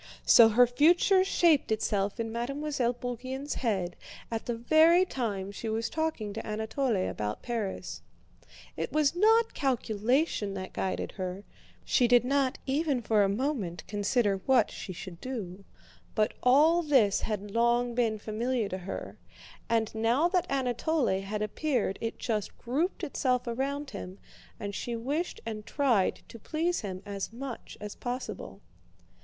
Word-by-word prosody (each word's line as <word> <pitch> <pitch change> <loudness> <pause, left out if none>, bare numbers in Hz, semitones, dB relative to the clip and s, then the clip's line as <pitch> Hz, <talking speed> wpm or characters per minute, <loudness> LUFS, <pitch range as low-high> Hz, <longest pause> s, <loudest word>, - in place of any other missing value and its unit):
So 230 -1 +8
her 245 +3 +6
future 345 +9 +4
shaped 335 -9 +3
itself 205 -1 0
in 225 -1 -2
Mademoiselle 255 +1 -1
Bourienne's 255 +3 -4
head 190 -8 -1 0.4
at 225 -1 -3
the 240 - -1
very 320 +9 +5
time 205 - -3
she 220 +2 -5
was 225 +1 -2
talking 315 -10 -2
to 225 - -5
Anatole 220 +4 -1
about 105 0 -4
Paris. 225 -5 -4 0.7
It - - -3
was 305 0 +2
not 445 +4 +4
calculation 240 -3 0
that 185 -1 -6
guided 190 - -2
her 185 +1 -4 0.4
(she 245 - +3
did 245 0 +5
not 275 0 +1
even 275 -2 0
for 215 -1 +3
a 195 - +3
moment 200 - -2
consider 205 +1 +1
what 255 -5 +4
she - - -7
should 180 -1 -9
do), 200 -7 -6 0.5
but 215 -1 +2
all 305 +7 +5
this 260 - +3
had 205 -2 -3
long 235 +2 +2
been 230 -3 +1
familiar 225 +2 -1
to 185 - -4
her, 185 +2 -7 0.5
and 225 -2 +1
now 230 +8 +2
that 360 -1 +1
Anatole 260 -4 0
had 210 +2 -3
appeared 240 -4 -1
it 225 - -3
just 215 -4 -3
grouped 300 +10 -2
itself 255 -3 0
around 275 +4 -3
him 190 -2 -7 0.4
and 205 0 -4
she 235 +4 -3
wished 285 +9 -3
and 215 -2 -5
tried 245 -10 +1
to 230 - -11
please 330 +8 -1
him 190 -2 -6
as 200 0 -4
much 250 +1 -7
as 210 -1 -6
possible. 245 +1 -6
235 Hz, 150 wpm, -29 LUFS, 210-275 Hz, 0.7 s, So